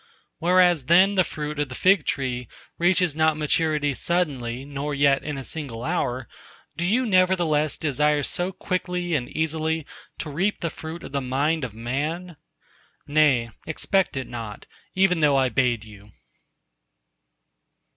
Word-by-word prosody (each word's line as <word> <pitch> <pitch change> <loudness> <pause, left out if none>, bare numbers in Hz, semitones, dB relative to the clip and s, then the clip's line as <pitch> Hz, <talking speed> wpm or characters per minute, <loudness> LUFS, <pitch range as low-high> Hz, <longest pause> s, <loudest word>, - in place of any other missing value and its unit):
Whereas 175 -4 +4
then 185 +5 +6
the 185 -2 +4
fruit 150 -2 -5
of 145 -2 -1
the 130 - -7
fig 190 -3 +3
tree 125 -3 -2 0.3
reaches 175 -2 +3
not 155 -1 +2
maturity 150 -1 +1
suddenly 135 -7 -1
nor 145 +1 -4
yet 140 -1 +3
in 150 -1 -4
a 135 - -5
single 130 -6 -5
hour, 125 0 -2 0.5
do 170 - -3
you 230 +9 +2
nevertheless 180 -7 +2
desire 150 0 +1
so 175 +6 0
quickly, 180 -2 -3
and 125 -5 -1
easily 160 0 -1 0.3
to 155 - -5
reap 190 +8 -1
the 170 - -2
fruit 160 +2 -8
of - - -8
the 140 0 -1
mind 140 +5 0
of 115 -4 -5
man?—Nay, 145 -1 -2 0.2
expect 180 +1 0
it 130 - -3
not, 115 -4 -7 0.3
even 185 -2 +3
though 145 -3 +4
I 130 -1 +3
bade 120 -2 +1
you!" 105 -1 -15
150 Hz, 145 wpm, -24 LUFS, 135-175 Hz, 0.5 s, then